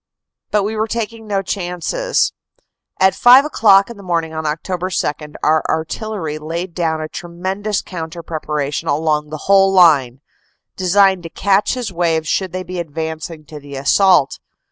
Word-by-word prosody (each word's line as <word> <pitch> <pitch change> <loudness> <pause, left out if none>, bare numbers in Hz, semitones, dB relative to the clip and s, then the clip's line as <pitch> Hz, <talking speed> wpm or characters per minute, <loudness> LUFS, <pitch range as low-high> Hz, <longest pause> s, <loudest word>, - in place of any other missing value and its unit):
But 210 -1 +1
we 215 +2 -2
were 220 +1 -1
taking 225 -1 -4
no 200 -2 -1
chances. 195 - -1 0.7
At 190 0 +4
five 255 +3 +7
o - - -3
clock 200 -7 +5
in 235 - -10
the - - -11
morning 165 -3 -2
of 160 0 -4
Oct. 150 +1 -2
2 175 -5 -3
our 155 0 +3
artillery 160 -1 -3
laid 170 +3 -5
down 160 -2 -1
a 155 - -4
tremendous 190 +6 -4
coun 165 -3 -6
ter 170 +1 -9
preparation 150 -3 -3
along 150 0 0
the 155 0 -7
whole 195 -1 +5
line, 145 -9 +4 0.6
designed 190 0 +3
to 165 - -8
catch 200 +6 +1
his 240 -6 -4
waves 165 -2 0
should 190 +1 -1
they 185 0 -4
be 185 -1 -6
advancing 160 0 -5
to 150 0 -10
the 140 -1 -10
assault. 155 +2 +3
175 Hz, 165 wpm, -18 LUFS, 155-195 Hz, 0.7 s, five